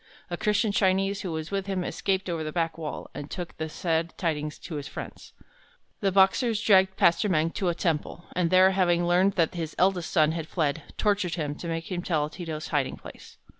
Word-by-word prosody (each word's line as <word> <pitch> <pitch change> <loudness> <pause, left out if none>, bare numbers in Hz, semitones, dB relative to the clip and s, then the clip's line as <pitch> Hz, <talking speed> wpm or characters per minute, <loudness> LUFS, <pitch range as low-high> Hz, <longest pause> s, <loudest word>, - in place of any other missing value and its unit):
A - - 0
Christian 210 +2 +1
Chinese 195 0 +1
who 185 - -4
was 160 +1 -4
with 195 -1 -2
him 190 -2 -1
escaped 190 +1 -1
over 165 -3 -2
the 155 - -4
back 165 0 -1
wall, 155 -2 -6
and 145 +1 -7
took 175 -2 -6
the 160 0 -3
sad 165 +1 -1
tidings 155 -4 -2
to 160 - -7
his 145 -1 -5
friends. - - -8 0.7
The 195 -2 +1
Boxers 200 +4 +3
dragged 190 -3 +4
Pastor 170 +5 +3
Meng 165 -2 +2
to 185 0 -1
a 170 - -1
temple, 165 0 -2
and 180 -2 +1
there, 185 +1 +6
having 175 -2 +2
learned 180 +3 +3
that 165 -2 +1
his 165 -3 -4
eldest 185 -2 +2
son 155 -1 +3
had 160 -1 -4
fled, 160 -2 -1 0.2
tortured 200 -4 +1
him 150 -4 -2
to 170 - -7
make 165 +1 -4
him 175 -1 -2
tell 155 -4 -1
Ti 175 - -7
to's 155 -1 -5
hiding 145 -4 0
place. - - -13
175 Hz, 210 wpm, -27 LUFS, 160-190 Hz, 0.7 s, there